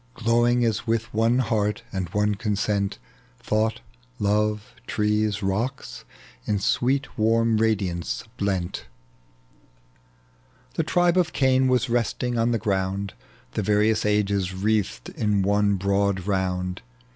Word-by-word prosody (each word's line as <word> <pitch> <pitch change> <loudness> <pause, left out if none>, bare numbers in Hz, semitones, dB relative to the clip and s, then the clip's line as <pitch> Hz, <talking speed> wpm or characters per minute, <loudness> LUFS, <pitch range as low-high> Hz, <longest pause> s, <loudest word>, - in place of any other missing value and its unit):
Glowing 120 +1 +2
as 115 0 -1
with 115 +1 -1
one 115 +3 +3
heart 105 -5 0
and 95 -3 -3
one 105 +3 +1
consent 100 -1 -1 0.2
— - - -32
Thought, 110 +1 0 0.4
love, 105 +1 0
trees, 105 0 0
rocks, 115 +8 -3 0.4
in 105 - 0
sweet 130 +6 0
warm 115 +1 +3
radiance 100 -6 0
blent, 95 -4 -2 1.9
The - - 0
tribe 175 0 +2
of 175 -2 0
Cain 130 -1 +3
was 130 0 +2
resting 120 +1 -1
on 115 0 +2
the 120 - +1
ground, 100 -1 -1 0.4
The - - -2
various 105 +2 +2
^es 100 -3 +1
wreathed 105 - 0
in 105 -3 0
one 100 +1 +2
broad 100 -1 0
round. 90 -2 -1
105 Hz, 120 wpm, -24 LUFS, 100-115 Hz, 1.9 s, one